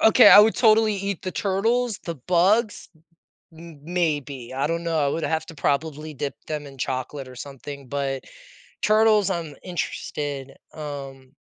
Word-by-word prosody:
O - - +7
Okay, 245 - +8
I - - +10
would 215 +1 +7
totally 220 -2 +4
eat 200 -1 -3
the 185 - -3
turtles, 220 +4 0
the 170 - -4
bugs, 185 - +1 0.6
m 160 -2 -13
maybe, 145 -7 -2
I 135 +2 0
don't 170 +1 -2
know, 165 -1 0
I - - +2
would 160 +3 -2
have 160 0 -1
to 165 - -10
probably 150 +1 -2
dip 140 +1 -4
them 150 -2 -4
in 135 -1 -12
chocolate 130 +2 -3
or 125 - -12
something, 140 0 -9
but 135 -1 -3 0.6
turtles, 215 -2 +4
I'm 165 -6 -4
interested, 145 -5 -4 0.2
um 135 -3 -8
155 Hz, 160 wpm, -24 LUFS, 140-195 Hz, 0.6 s, I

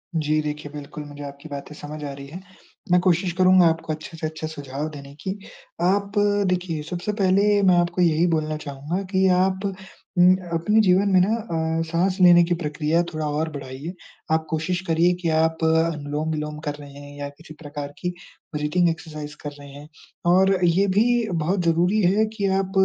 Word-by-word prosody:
जी, 155 -1 +1
देखिए 150 -1 -5
बिल्कुल 150 0 -8
मुझे 145 0 -9
आपकी 140 +2 -11
बातें 140 +1 -7
समझ 150 +1 -8
आ 145 - -4
रही 140 0 -9
हैं, 170 +6 -9 0.5
मैं 180 - +6
कोशिश 180 0 +2
करूँगा 185 -1 +6
आपको 160 -1 -1
अच्छे 155 +2 -9
से 160 - -2
अच्छे 155 0 -5
सुझाव 145 -1 -5
देने 140 -2 -10
की। 190 +1 -3 0.4
आप 200 +3 +1 0.4
देखिए 180 -3 -1
सबसे 180 +3 -3
पहले 200 +1 +3
मैं 185 -2 +5
आपको 175 +1 +1
यही 170 0 +3
बोलना 155 -2 0
चाहूँगा 150 +4 -4
कि 190 -1 +3
आप 190 +1 +2 0.5
उम, 180 +1 +7 0.2
अपने 190 +7 +2
जीवन 195 0 +3
में 185 - +6
ना 210 +5 +2 0.4
अ, - - +1
साँस 180 +3 0
लेने 175 -1 +8
की 175 +1 0
प्रक्रिया 150 +2 +1
थोड़ा 155 0 -2
और 155 +2 -1
बढ़ाइए। 140 +3 -7 0.4
आप 160 0 +2
कोशिश 160 +3 -1
करिए 170 +2 +3
कि 170 - 0
आप 160 +1 +1
अनुलोम-विलोम 155 -1 0
कर 145 - 0
रहे 145 -1 -10
हैं 145 0 -11
या 145 - -3
किसी 155 +3 -14
प्रकार 145 -2 -7
की 180 - -2 0.5
ब्रीथिंग 150 +4 +2
एक्सरसाइज़ 155 -2 -6
कर 145 - -3
रहे 140 0 -11
हैं। 145 +2 -11 0.5
और 190 +1 +4
ये 185 +4 +3
भी 235 +2 +3
बहुत 175 +3 0
ज़रूरी 175 +6 +2
है 200 +4 +3
कि 200 - +1
आप 190 -1 -3
160 Hz, 185 wpm, -23 LUFS, 150-185 Hz, 0.5 s, लेने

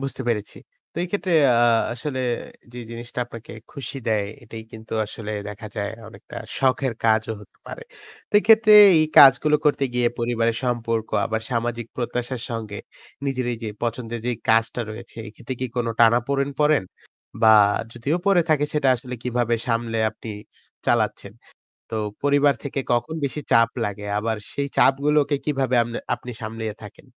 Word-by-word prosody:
বুঝতে 135 -1 -4
পেরেছি। 105 -3 -2 0.4
তো - - -31
এই - - -7
ক্ষেত্রে 195 -3 -1 0.3
আ - - +6 0.3
আসলে 130 +2 -4 0.5
যে 125 - -8
জিনিসটা 120 +1 -6
আপনাকে 115 -1 -10 0.2
খুশি 135 0 -7
দেয় 105 -2 +1 0.2
এটাই 110 -1 -9
কিন্তু 110 0 -11
আসলে 110 0 -7 0.2
দেখা 105 +1 -8
যায় 100 0 -2 0.2
অনেকটা 115 - -12 0.2
শখের 130 -1 +1
কাজও 110 0 +2
হতে 105 - -18
পারে। - - -8 0.5
তো - - -53
এক্ষেত্রে 220 0 +5 0.3
এই 155 - +3
কাজগুলো 145 +2 +7
করতে 145 -2 +2
গিয়ে 120 -1 +2
পরিবারের 115 -1 0
সম্পর্ক 115 -2 -1 0.2
আবার 110 0 -2
সামাজিক 120 -1 -2
প্রত্যাশার 120 0 -3
সঙ্গে 115 -2 -5 0.5
নিজের 130 -2 -1
এইযে 115 -1 -5
পছন্দের 120 -1 -3
যে 125 - +1 0.2
কাজটা 115 +2 +2
রয়েছে 110 - -10
এ - - -10
ক্ষেত্রে 130 +4 -6
কি 130 - -1
কোন 120 - 0
টানাপোড়েন 125 +5 +3
পড়েন? 150 -8 +3 0.6
বা 110 -1 +8 0.4
যদিও 135 +8 -1
পড়ে 195 -3 +5
থাকে 150 -2 +3
সেটা 150 -3 +1
আসলে 125 +1 -7
কিভাবে 120 -2 0
সামলে 115 -1 -1
আপনি 110 +1 -12 0.6
চালাচ্ছেন? - - 0 0.6
তো - - -4 0.3
পরিবার 145 0 +3
থেকে 140 -1 -3
কখন 120 +7 0
বেশি 145 +2 -2
চাপ 115 0 +5
লাগে? 105 0 -5
আবার 110 +1 -1 0.2
সেই 140 0 -2
চাপগুলোকে 145 +1 +3
কিভাবে 135 -4 0
আমনে 120 0 -4 0.2
আপনি 120 0 -9
সামলিয়ে 110 -1 -5
থাকেন? 105 - -12
120 Hz, 155 wpm, -23 LUFS, 115-135 Hz, 0.6 s, বা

